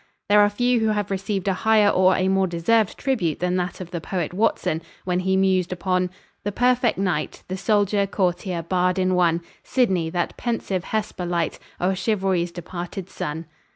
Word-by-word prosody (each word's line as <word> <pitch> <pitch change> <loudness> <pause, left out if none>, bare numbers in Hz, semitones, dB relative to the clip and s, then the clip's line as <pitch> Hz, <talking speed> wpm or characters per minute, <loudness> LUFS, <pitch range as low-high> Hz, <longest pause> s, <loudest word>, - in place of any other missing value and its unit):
There 210 0 +6
are 205 - +5
few 245 +3 +1
who 220 - +1
have 210 -2 -1
received 195 0 -2
a 195 - +3
higher 215 +1 +3
or 185 -1 +4
a 185 - +1
more 190 0 +2
deserved 185 +5 +1
tribute 190 - -1
than 180 0 0
that 180 0 -3
of 180 -2 -8
the 170 - -4
poet 175 -1 -3
Watson, 180 -5 0 0.2
when 180 -1 0
he 190 +1 +1
mused 190 -2 +2
upon 180 0 0 0.3
"the 205 - -1
perfect 245 +2 +2
knight, 185 -5 -2
The 185 - -2
soldier, 205 0 +2
courtier, 180 -2 -1
bard 180 +2 +1
in 185 0 +2
one, 170 -2 +2 0.2
Sidney, 190 -10 +1
that 175 0 -2
pensive 200 -6 -2
Hesper 205 -4 -3
light 170 -2 -1 0.2
O'er 185 +2 +1
Chivalry's 190 -3 0
departed 175 +2 -7
Sun." 160 +3 -4
185 Hz, 180 wpm, -23 LUFS, 175-205 Hz, 0.3 s, There